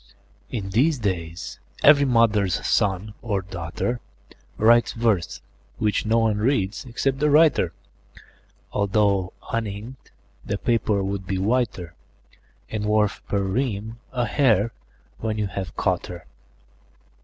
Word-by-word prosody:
IN 100 -6 -4
these 140 +8 +3
days, 90 -4 -4 0.2
every 145 -1 +7
mother's 110 -7 +2
son 100 +1 +1
or 100 -5 -1
daughter 95 +6 -3 0.6
Writes 115 +2 +4
verse, 110 -7 0 0.4
which 105 0 0
no 115 +1 +3
one 110 -2 +2
reads 110 -3 0
except 135 +2 -1
the 150 +1 +3
writer, 145 - +4 1.0
Although, 100 -2 +1 0.2
uninked, 115 +3 -5 0.3
the 100 - -2
paper 110 -4 +1
would 95 -1 -3
be 95 -1 -1
whiter, 100 -4 -1 0.8
And 110 -1 -2
worth, 105 -1 +1
per 100 -1 0
ream, 110 +1 -2
a 125 -2 0
hare, 115 -4 +2 0.5
when 110 -1 -2
you 105 - 0
have 95 -2 -5
caught - - 0
her. 85 -2 -9
105 Hz, 120 wpm, -24 LUFS, 95-120 Hz, 1.0 s, every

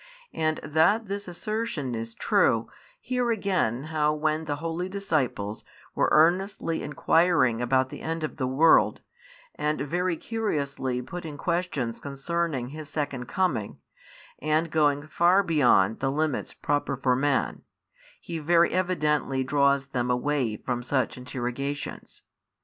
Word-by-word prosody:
And 155 0 0
that 180 +9 +3
this 200 0 -5
assertion 180 - -3
is 115 0 -5
true, - - +2 0.3
hear 250 -1 -1
again 185 - 0
how 150 -1 0
when 155 +1 0
the 145 -1 -2
holy 165 +4 -3
disciples 140 - -2 0.3
were - - +2
earnestly 170 +1 +2
inquiring 150 -6 +2
about 130 +1 +2
the - - -9
end 165 0 -3
of 155 - -4
the 130 -3 -1
world, 150 +6 +4 0.5
and 150 +1 -1
very 175 +4 -1
curiously 140 - -2
putting 160 0 -7
questions 170 -9 -2
concerning 140 -2 -2
His 155 +1 -8
second 140 -5 -3
coming, 180 - -1 0.6
and 155 +2 0
going 145 -2 +2
far 175 +5 +3
beyond 125 - +3
the 135 0 0
limits 155 0 -1
proper 145 -2 -1
for 125 -1 +2
man, 140 +1 0 0.6
He 170 -1 -5
very 170 +2 +3
evidently 150 -7 0
draws 140 0 +2
them 125 -3 -2
away 125 -2 0
from 125 +1 -3
such 130 +1 0
interrogations. 125 +3 -5
150 Hz, 130 wpm, -26 LUFS, 130-170 Hz, 0.6 s, world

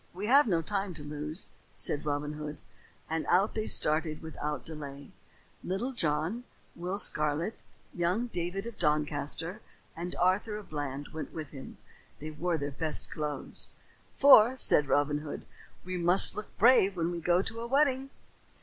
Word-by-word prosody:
We 195 +3 -5
have 275 +4 +5
no 170 -5 +1
time 195 0 -3
to 150 - -9
lose," 150 +3 -4 0.3
said 150 +1 +2
Robin 145 0 -2
Hood; 150 0 -7 0.5
and 160 0 -2
out 190 +4 +2
they 215 -1 -3
started 155 0 +3
without 150 -2 -5
delay. 145 -3 -8 0.5
Little 210 +8 -3
John, 165 - -1 0.3
Will 180 +3 -4
Scarlet, 155 +2 +2 0.3
young 180 +7 0
David 180 -2 -4
of 235 -2 -9
Doncaster, 150 +5 -1 0.3
and 175 +2 -6
Arthur 190 +4 0
a 210 - -8
Bland 145 -4 -6
went 155 -1 -7
with 155 -3 -7
him. 135 -2 -10 0.4
They 155 +1 -7
wore 170 +2 -2
their 145 -1 -4
best 155 +2 -1
clothes. 150 -2 -5 0.5
"For," 260 -3 +7
said 150 - +4
Robin 145 +1 +1
Hood, 150 -1 -8 0.4
"we 185 0 -4
must 175 +3 +7
look 210 - -8
brave 200 -4 +4
when 170 0 -1
we 170 -1 -5
go 175 +2 +2
to 225 +2 -6
a 235 - -5
wedding." 270 0 +1
170 Hz, 160 wpm, -29 LUFS, 150-200 Hz, 0.5 s, For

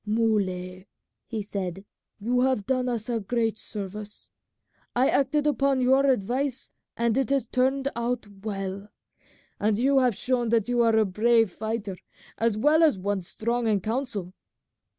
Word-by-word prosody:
"Muley," 195 -4 -1 0.4
he 220 -3 -3
said, 195 -2 -5 0.3
"you 245 +4 +1
have 255 -6 +1
done 255 +1 0
us 230 -3 -3 0.2
great 225 -2 0
service. 210 0 -7 0.6
I 255 +2 +4
acted 285 +2 +2
upon 275 -2 +2
your 265 +2 +4
advice 255 +3 -1 0.3
and 235 -1 +1
it 270 - 0
has 275 -3 +1
turned 265 +3 +1
out 235 0 -2 0.2
well; 195 -1 -4 0.7
and 210 0 +2
you 270 +3 +3
have 250 -4 +2
shown 245 0 0
that 225 -2 +2
you 245 -1 +2
are 230 -1 +4
a 220 - +4
brave 225 +2 +3
fighter 215 -2 -4 0.4
as 225 -2 +1
well 300 +8 +4
as 310 -9 +4
one 200 +1 -1
strong 235 +6 -2
in 210 -2 +2
counsel. 215 -4 -3
230 Hz, 150 wpm, -26 LUFS, 205-255 Hz, 0.7 s, I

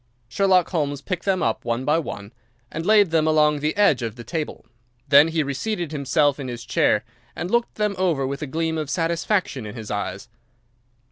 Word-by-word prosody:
Sherlock 185 +7 +2
Holmes 145 -5 -1
picked 180 +5 -5
them 190 -2 +1
up 115 - -1
one 120 +2 -2
by 150 +3 +3
one, 100 -8 -7 0.4
and 165 +3 -4
laid 210 -5 +5
them 160 -1 +2
along 150 -1 +3
the 150 +5 -1
edge 200 - +4
of 115 -2 -4
the 120 - -9
table. 160 +2 -5 0.4
Then 145 +1 +7
he 165 -1 0
reseated 170 +5 -3
himself 145 0 +1
in 135 - -5
his 120 -1 -6
chair 105 - +2 0.3
and 175 - -4
looked 235 0 +1
them 210 -1 0
over 165 -8 +1
with 140 +2 -4
a 150 - -3
gleam 160 +3 -1
of 150 -2 -4
satisfaction 170 - -1
in 105 +1 -8
his 110 -3 -7
eyes. 100 -2 -4
150 Hz, 195 wpm, -23 LUFS, 130-175 Hz, 0.4 s, Then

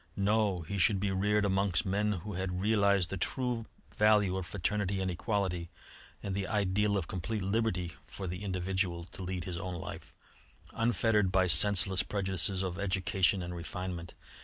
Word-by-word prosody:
No! 100 -2 +1
he 95 +5 -4
should 95 +1 +3
be 100 0 0
reared 105 +2 +1
amongst 95 -4 +1
men 105 +2 +1
who 100 +3 -6
had 90 0 -3
realised 100 -3 +3
the 95 - -2
true 120 +3 -2 0.3
value 105 -3 +4
of 95 -2 -3
fraternity 100 +2 -1
and 95 -1 -1
equality 90 -2 -2 0.5
and 100 - -3
the 95 0 -2
ideal 100 0 +1
of 90 - -3
complete 100 +3 -3
liberty 95 -4 -1
for 95 - -7
the 90 +3 -5
individual 90 -2 -2
to 95 +1 -11
lead 90 -1 -3
his 85 0 -5
own 90 +1 -4
life, 85 - -8 0.6
unfettered 115 -4 +2
by 95 -1 +3
senseless 95 +2 +6
prejudices 95 -1 0
of 90 0 -4
education 95 -1 +1
and 90 0 -5
refinement. 85 -1 -6
95 Hz, 160 wpm, -31 LUFS, 90-105 Hz, 0.6 s, senseless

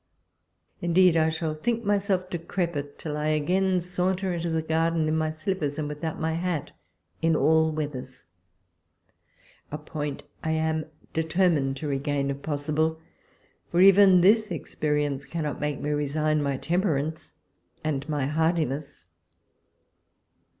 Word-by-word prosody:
Indeed 175 0 +4
I 160 -1 +3
shall 160 -1 -2
think 230 +9 -1
myself 200 -2 +1
decrepit, 170 -4 -3
till 150 -2 -4
I 150 0 -1
again 180 +5 +2
saunter 180 +1 -1
into 170 0 -2
the 160 -1 0
garden 160 0 +1
in 155 - +1
my 160 0 +1
slippers 155 -2 -2
and 155 -2 -2
with 150 +2 -7
out 160 -1 -3
my 160 0 0
hat 170 -3 -2 0.5
in 165 -1 +3
all 160 0 +3
weathers 145 -4 -5 0.7
— - - -34
a 150 - -3
point 150 -1 -5 0.2
I 160 -1 0
am 160 -1 0 0.3
deter 165 +3 +2
mined 135 -4 0
to 150 - -4
regain 140 0 -1
if 140 0 -6
possible: 155 +2 -1 0.7
for 170 - 0
even 190 -1 +7
this 210 +2 +4
ex 165 - -6
perience 145 -2 -1
cannot 155 -4 -3
make 150 -2 -1
me 150 - -2
resign 150 +1 0
my 140 -2 -1
temperance 160 -2 -1 0.5
and 145 -2 -2
my 145 -3 0
hardiness. 150 - -1
160 Hz, 145 wpm, -26 LUFS, 150-175 Hz, 0.7 s, even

